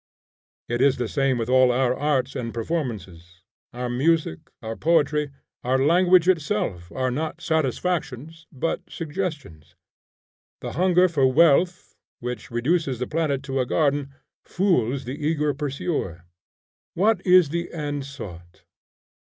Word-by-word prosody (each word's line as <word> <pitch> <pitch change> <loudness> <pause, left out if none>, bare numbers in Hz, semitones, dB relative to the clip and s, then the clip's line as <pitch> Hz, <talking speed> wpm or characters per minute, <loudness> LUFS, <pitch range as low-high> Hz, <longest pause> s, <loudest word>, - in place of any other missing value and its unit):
It 120 +1 -1
is 135 -1 +4
the 120 -2 -2
same 135 0 +1
with 115 -1 -2
all 130 0 +5
our 125 0 +2
arts 135 -3 0
and 115 -3 -4
performances. 95 - -5 0.3
Our 125 0 -4
music, 135 - +1 0.2
our 110 0 -4
poetry, 150 -1 +1 0.3
our 130 +2 +2
language 175 +5 +4
itself 160 - 0
are 130 -1 -1
not 155 +5 -3
satisfactions, 160 0 -2
but 145 +4 -2
suggestions. 145 - -6 0.9
The - - -5
hunger 180 +3 +3
for 140 -6 +2
wealth, 170 +4 +3 0.3
which 125 -2 -6
reduces 135 +3 0
the 125 - -2
planet 150 -2 -1
to 135 -1 -2
a 130 - +1
garden, 140 -1 0 0.3
fools 140 - 0
the 140 +5 -6
eager 150 -1 +1
pursuer. 140 - -3 0.7
What 200 +1 +2
is 180 -4 +5
the 170 +2 -3
end 145 -3 -4
sought? 90 -11 -10
140 Hz, 130 wpm, -24 LUFS, 125-165 Hz, 0.9 s, all